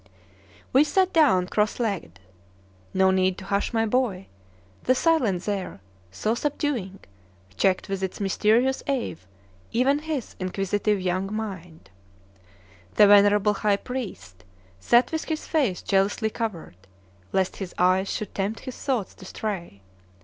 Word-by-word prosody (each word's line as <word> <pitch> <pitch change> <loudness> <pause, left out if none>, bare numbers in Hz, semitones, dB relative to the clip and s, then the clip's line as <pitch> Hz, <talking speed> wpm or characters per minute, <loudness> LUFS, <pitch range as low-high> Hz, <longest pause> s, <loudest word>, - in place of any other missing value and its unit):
We 270 +3 +7
sat 370 +5 +1
down 265 - +4
cross 210 +4 0
legged. 195 - -3 0.7
No 190 0 +3
need 185 0 +1
to 190 - -9
hush 200 +1 -1
my 225 -1 +1
boy, 215 -5 0 0.6
the 255 - +4
silence 250 - +1
there, 200 - -3 0.3
so 155 - -1
subduing, 240 -8 -2 0.5
checked 190 - +1
with 195 -1 -3
its 190 -1 -4
mysterious 220 +6 +2
awe 265 -4 -1 0.6
even 270 +5 +2
his 300 -5 -4
inquisitive 195 +2 -1
young 185 +2 -1
mind. 180 - -6 1.0
The 210 - +7
venerable 205 0 +5
high 205 0 +1
priest 95 - -7 0.4
sat 240 - +3
with 320 -1 -2
his 315 -1 -3
face 265 - 0
jealously 200 +3 +1
covered, 205 - -5 0.5
lest 190 -1 0
his 190 -3 -7
eyes 185 +2 +2
should 215 - -4
tempt 200 +3 -2
his 255 - -7
thoughts 250 -8 -1
to 190 - -14
stray. 180 - -5
205 Hz, 135 wpm, -25 LUFS, 190-245 Hz, 1.0 s, We